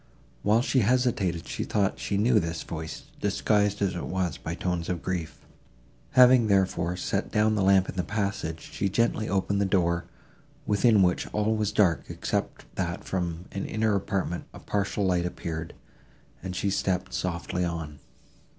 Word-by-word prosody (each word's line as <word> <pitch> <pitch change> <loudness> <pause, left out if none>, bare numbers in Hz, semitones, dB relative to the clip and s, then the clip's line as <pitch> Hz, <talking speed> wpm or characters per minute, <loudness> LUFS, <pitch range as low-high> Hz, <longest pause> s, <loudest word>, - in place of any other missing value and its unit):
While 110 +3 +3
she 135 -1 +2
hesitated 110 -7 +1
she - - -3
thought 100 -2 0
she 100 - -1
knew 110 +2 +4
this 85 -2 -3
voice, 80 0 -6 0.2
disguised 105 -1 +1
as 95 -2 +1
it 85 - -4
was 90 -4 -1
by 85 - -5
tones 90 -2 -2
of 90 -3 -2
grief. 90 -4 -4 0.7
Having, 125 -2 +7
therefore, 95 -3 +1
set 100 +3 -2
down 110 0 +3
the 105 - +1
lamp 95 -1 +4
in - - -5
the - - +2
passage, 100 -4 -2
she 100 - 0
gently 115 +1 +1
opened 100 +1 +1
the - - +3
door, 90 -3 +1 0.6
within 105 0 +4
which 90 -1 +1
all 105 +1 0
was 105 -1 0
dark, 85 -8 +3
except - - -3
that - - -2
from 90 -2 -3
an 100 - -4
inner 110 -1 +1
apartment 95 -3 -1
a - - -9
partial 100 0 -1
light 90 -1 +2
appeared; 80 -2 -5 0.7
and 90 -1 -5
she 100 +1 0
stepped 95 -1 -1
softly 90 0 -2
on. 80 -4 -4
95 Hz, 165 wpm, -27 LUFS, 85-105 Hz, 0.7 s, Having